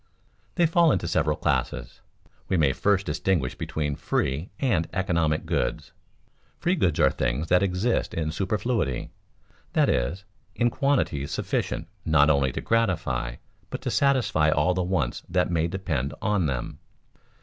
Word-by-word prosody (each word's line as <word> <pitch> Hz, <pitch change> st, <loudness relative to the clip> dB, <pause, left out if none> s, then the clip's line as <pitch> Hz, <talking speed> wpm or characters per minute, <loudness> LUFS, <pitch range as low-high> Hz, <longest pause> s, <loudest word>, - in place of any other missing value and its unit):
_ -, -, -39 dB, 0.5 s
They 175 Hz, -, +4 dB
fall 165 Hz, 0 st, +4 dB
into 85 Hz, -, 0 dB
several 75 Hz, -2 st, +1 dB
classes. -, -, -2 dB, 0.5 s
We 95 Hz, -, +2 dB
may 70 Hz, -5 st, +3 dB
first 100 Hz, +4 st, +1 dB
distinguish 85 Hz, -10 st, 0 dB
between 75 Hz, -2 st, -3 dB
free 70 Hz, +6 st, -1 dB
and 100 Hz, -, +1 dB
economic 85 Hz, -5 st, 0 dB
goods. -, -, -2 dB, 0.7 s
Free 175 Hz, +1 st, +1 dB
goods 90 Hz, -, +1 dB
are -, -, +5 dB
things 65 Hz, +7 st, -2 dB
that 90 Hz, 0 st, +4 dB
exist 100 Hz, +5 st, 0 dB
in 80 Hz, -1 st, -1 dB
superfluity, 95 Hz, -, -1 dB, 0.6 s
that -, -, +3 dB
is, 80 Hz, +11 st, -1 dB, 0.3 s
in 120 Hz, 0 st, +2 dB
quantities 130 Hz, -, 0 dB
sufficient -, -, -2 dB, 0.2 s
not 80 Hz, -1 st, +4 dB
only 70 Hz, -2 st, +2 dB
to -, -, -3 dB
gratify, 75 Hz, -, 0 dB, 0.3 s
but -, -, -5 dB
to -, -, -2 dB
satisfy 130 Hz, -, +2 dB
all 75 Hz, +4 st, +2 dB
the 90 Hz, -, -1 dB
wants 90 Hz, -9 st, -1 dB
that 90 Hz, 0 st, +1 dB
may 85 Hz, -1 st, +1 dB
depend 80 Hz, -7 st, -2 dB
on 105 Hz, -6 st, +1 dB
them. 65 Hz, -3 st, -4 dB
85 Hz, 150 wpm, -26 LUFS, 75-100 Hz, 0.7 s, are